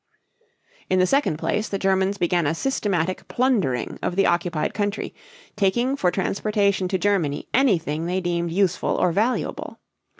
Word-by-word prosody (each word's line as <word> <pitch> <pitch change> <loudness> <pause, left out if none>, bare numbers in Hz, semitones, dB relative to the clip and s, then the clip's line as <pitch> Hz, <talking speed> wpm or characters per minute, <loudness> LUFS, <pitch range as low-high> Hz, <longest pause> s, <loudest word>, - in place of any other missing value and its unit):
In 185 - +2
the 185 - +4
second 270 - +1
place, 215 +6 -1
the 200 - -2
Germans 190 +1 +1
began 175 -3 +1
a 160 - 0
systematic 185 -6 -1
plundering 210 - 0
of 175 - -2
the 195 0 +3
occupied 170 -2 0
country, 205 0 -2 0.4
taking 235 +6 +1
for 185 -10 +1
transportation 200 +1 0
to 190 +1 0
Germany 180 -7 0
anything 170 - +1
they 180 +2 0
deemed 170 -2 -1
useful 185 0 +1
or 180 - +2
valuable. 220 +8 -1
190 Hz, 145 wpm, -23 LUFS, 175-205 Hz, 0.4 s, the